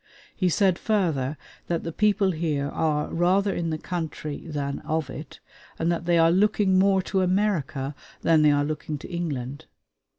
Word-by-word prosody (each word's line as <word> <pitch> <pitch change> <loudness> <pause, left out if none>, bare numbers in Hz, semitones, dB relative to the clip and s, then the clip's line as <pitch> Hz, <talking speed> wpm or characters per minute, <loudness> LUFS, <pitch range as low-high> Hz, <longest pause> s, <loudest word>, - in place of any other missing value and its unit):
He 185 -2 +1
said 185 0 +2
further 160 - 0 0.3
that 170 -1 -1
the 165 - -4
people 205 +1 +2
here 155 -4 -1
are 150 -1 -1
rather 190 +4 +2
in 170 -2 -2
the 155 - -1
country 160 -3 -5
than 140 -3 -3
of 155 -3 -2
it, 150 +1 -9 0.4
and 165 +1 +1
that 170 0 -2
they 175 0 +3
are 165 0 +5
looking 195 0 +3
more 195 -1 +3
to 190 0 0
America 180 -8 0 0.3
than 160 -2 +4
they 150 - +6
are 145 0 +3
looking 155 0 -4
to - - -10
England. 150 -4 -4
165 Hz, 170 wpm, -25 LUFS, 150-185 Hz, 0.4 s, they